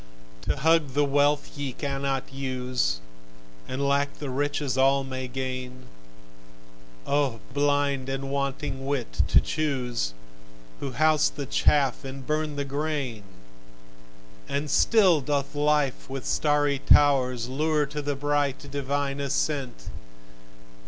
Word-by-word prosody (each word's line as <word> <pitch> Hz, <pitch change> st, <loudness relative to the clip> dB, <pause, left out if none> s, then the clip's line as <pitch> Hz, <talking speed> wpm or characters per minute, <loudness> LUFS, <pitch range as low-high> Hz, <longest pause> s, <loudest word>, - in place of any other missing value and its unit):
To -, -, +2 dB
hug 155 Hz, -1 st, +2 dB
the 145 Hz, 0 st, +4 dB
wealth 145 Hz, +1 st, +1 dB
ye 140 Hz, -3 st, -4 dB
cannot 135 Hz, -1 st, -3 dB
use, 125 Hz, -, -1 dB, 0.7 s
And 140 Hz, +2 st, -1 dB
lack 140 Hz, 0 st, +1 dB
the 145 Hz, -3 st, -5 dB
riches 145 Hz, -1 st, -1 dB
all 135 Hz, +1 st, +4 dB
may 130 Hz, -1 st, -5 dB
gain, 130 Hz, 0 st, -5 dB, 1.2 s
O 140 Hz, -5 st, +1 dB
blind 145 Hz, -2 st, +1 dB
and 135 Hz, 0 st, -3 dB
wanting 140 Hz, -1 st, -2 dB
wit 140 Hz, -4 st, -1 dB
to -, -, +6 dB
choose, 125 Hz, -, -2 dB, 0.6 s
Who 135 Hz, -, -4 dB
house 155 Hz, +3 st, +3 dB
the 140 Hz, -, -6 dB
chaff 140 Hz, -1 st, +2 dB
and 135 Hz, 0 st, -7 dB
burn 155 Hz, 0 st, -1 dB
the 140 Hz, 0 st, -2 dB
grain! 140 Hz, -5 st, -2 dB, 1.3 s
And 140 Hz, +1 st, -2 dB
still 185 Hz, -5 st, +5 dB
doth 140 Hz, 0 st, -1 dB
life 145 Hz, -3 st, +1 dB
with 135 Hz, -1 st, -5 dB
starry 145 Hz, -2 st, +2 dB
towers 130 Hz, -5 st, +4 dB
Lure 150 Hz, +3 st, +1 dB
to 150 Hz, +1 st, -5 dB
the 145 Hz, 0 st, -2 dB
bright, 145 Hz, 0 st, -1 dB
divine 140 Hz, 0 st, -2 dB
ascent! 140 Hz, -, -2 dB
140 Hz, 120 wpm, -26 LUFS, 130-145 Hz, 1.3 s, to